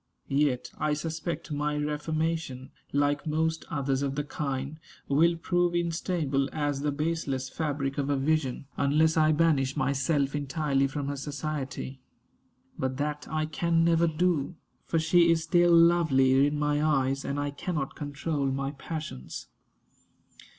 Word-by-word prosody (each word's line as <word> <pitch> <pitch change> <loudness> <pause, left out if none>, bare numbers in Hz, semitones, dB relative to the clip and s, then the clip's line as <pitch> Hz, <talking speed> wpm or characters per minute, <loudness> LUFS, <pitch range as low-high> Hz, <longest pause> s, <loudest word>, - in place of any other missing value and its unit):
Yet 140 -3 +1
I 150 - +1
suspect 160 +2 -4
my 150 0 -1
reformation, 150 -2 -2 0.2
like 145 +2 +1
most 160 +1 0
others 135 -3 -1
of 140 -1 -1
the 145 - -1
kind, 140 0 -4 0.3
will 165 +5 +4
prove 175 +1 +1
instable 165 -5 0
as 145 -2 -1
"the 145 0 0
baseless 145 -3 -2
fabric 145 -3 -2
of 140 0 -1
a 140 - +2
vision," 140 -2 0
unless 155 +3 +3
I 155 -1 +4
banish 150 -4 +2
myself 140 0 +1
entirely 140 -1 0
from 140 +1 -4
her 145 - -2
society. 140 -2 -4 0.8
But 130 0 -1
that 150 0 -3
I 155 0 0
can 165 +1 +1
never 170 0 +4
do; 165 -1 0 0.3
for 165 - +1
she 170 +2 +4
is 165 -1 +3
still 175 0 +4
lovely 150 -6 +5
in 145 0 -1
my 150 0 +1
eyes, 135 -2 +1
and 140 +1 -2
I 145 0 -1
cannot 145 -1 -3
control 145 0 -2
my 135 +1 -1
passions. 150 - -7
150 Hz, 145 wpm, -28 LUFS, 140-160 Hz, 0.8 s, lovely